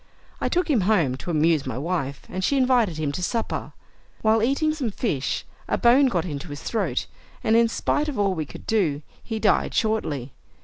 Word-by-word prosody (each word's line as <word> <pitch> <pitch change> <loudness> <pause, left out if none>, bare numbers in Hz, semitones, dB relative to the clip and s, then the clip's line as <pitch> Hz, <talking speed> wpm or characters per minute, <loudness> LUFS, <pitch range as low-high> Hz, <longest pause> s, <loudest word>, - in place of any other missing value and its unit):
I - - 0
took 360 +1 +1
him 270 -9 +3
home, 165 -12 +3
to 155 - -7
amuse 155 -3 +2
my 125 -2 -3
wife, 140 -2 -2
and 185 - -4
she 280 - +2
invited 245 - +3
him 155 -2 -1
to 160 - -4
supper. 230 +5 -2 0.5
While 220 0 +4
eating 280 +6 +2
some 275 -7 -2
fish, 195 - -2 0.2
a - - +1
bone 260 +3 +5
got 180 -8 0
into 155 0 -5
his 145 -1 -8
throat, 225 - -1 0.4
and 220 - +3
in 230 0 +5
spite 295 +6 0
of 285 - -5
all 200 -2 +2
we 155 -4 -3
could - - -11
do, 160 -10 +1 0.2
he 225 - -4
died 215 -1 +2
shortly. 150 - -1
200 Hz, 200 wpm, -24 LUFS, 155-235 Hz, 0.5 s, bone